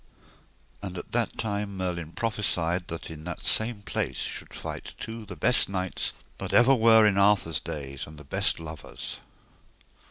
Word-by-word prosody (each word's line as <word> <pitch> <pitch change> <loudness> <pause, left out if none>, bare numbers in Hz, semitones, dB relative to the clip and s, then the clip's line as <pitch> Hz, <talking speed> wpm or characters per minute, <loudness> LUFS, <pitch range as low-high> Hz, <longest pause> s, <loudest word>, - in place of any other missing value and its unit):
And 95 -2 -5
at - - -7
that 120 -1 0
time 100 -2 -2
Merlin 85 -3 -3
prophesied 90 -6 0
that 85 0 -6
in 80 -1 -8
that 85 -1 -5
same 110 -2 +2
place - - -2
should - - -4
fight - - -6
two 110 -1 -6
the 95 - -7
best 120 +10 +4
knights 95 -1 -1 0.3
that - - -4
ever 120 +3 +7
were 110 -3 +7
in 100 -2 +4
Arthur's 100 -6 +4
days, 70 -2 -5
and 75 +1 -11
the 75 - -10
best 70 - +1
lovers. 80 -2 -7
95 Hz, 160 wpm, -28 LUFS, 80-110 Hz, 0.3 s, ever